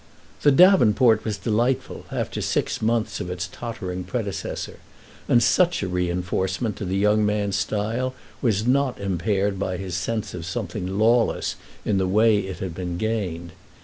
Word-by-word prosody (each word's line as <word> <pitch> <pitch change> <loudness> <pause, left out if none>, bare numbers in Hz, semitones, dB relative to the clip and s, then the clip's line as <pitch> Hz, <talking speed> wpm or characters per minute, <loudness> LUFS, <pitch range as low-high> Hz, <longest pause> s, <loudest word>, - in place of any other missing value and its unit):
The 145 - +5
davenport 125 - +5
was 110 -2 -2
delightful, 120 +4 -1
after - - -3
six - - -1
months 110 -2 0
of 90 - -4
its 90 -1 -3
tottering 95 -6 -5
predecessor, 100 +1 -4 0.5
and 120 -1 +5
such 175 - +3
a - - -1
re 90 -1 -1
enforcement 95 +4 -1
to 100 - -4
the 95 +1 -1
young 105 +2 +3
man's 105 -2 0
style 115 +6 -1 0.3
was 110 -3 +1
not 130 0 +1
impaired 95 +1 0
by 95 -1 -2
his 95 -1 -6
sense 110 +4 -2
of 90 - -6
something 95 -1 -4
lawless 115 +2 +2 0.3
in 100 -2 +1
the 95 - +1
way 105 +2 +4
it 95 -3 -5
had 95 -3 -3
been 90 0 -4
gained. 90 -6 -2
105 Hz, 160 wpm, -24 LUFS, 95-115 Hz, 0.5 s, The